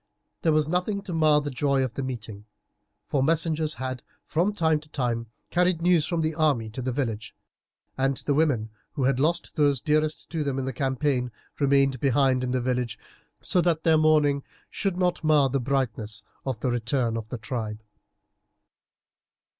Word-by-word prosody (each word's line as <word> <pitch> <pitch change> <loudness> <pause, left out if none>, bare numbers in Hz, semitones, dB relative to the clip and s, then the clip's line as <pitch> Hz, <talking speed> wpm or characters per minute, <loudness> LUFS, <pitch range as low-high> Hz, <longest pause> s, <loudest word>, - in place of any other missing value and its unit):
There 160 - +3
was 155 -1 +3
nothing 180 +4 -1
to 185 - -5
mar 155 -2 +4
the 145 0 -4
joy 135 +1 +1
of 130 -3 -3
the 135 - -4
meeting, 110 -5 -6 0.6
for 140 - 0
messengers 160 +1 +1
had 130 0 -4 0.2
from 175 +6 +1
time 160 -6 +2
to 150 0 -16
time 120 -5 -2 0.2
carried 180 -1 +2
news 170 -2 +3
from 170 -2 0
the 160 0 0
army 145 -9 +1
to 130 - -5
the 130 +1 -1
village, 115 -5 -3 0.6
and 135 0 +1
the 145 - -1
women 135 -8 +1 0.2
who 140 - -2
had 130 0 +2
lost 160 +5 0
those 145 -3 +3
dearest 155 +2 0
to 160 -2 -1
them 140 -2 -2
in 135 - -2
the 135 - -3
campaign 130 -1 0 0.3
remained 140 -2 +3
behind 130 -1 +2
in 125 - -1
the 130 0 +1
village, 125 -3 -1 0.5
so 180 - +2
that 165 -2 +1
their 160 -1 +5
mourning 150 -2 +3 0.3
should 195 -3 -1
not 180 -2 0
mar 150 -3 +4
the 135 +2 0
brightness 115 -5 -2 0.2
of 125 -4 -3
the 125 - 0
return 120 0 0
of 110 -1 -5
the 125 - -4
tribe. 110 -1 -5
140 Hz, 180 wpm, -26 LUFS, 125-155 Hz, 0.6 s, their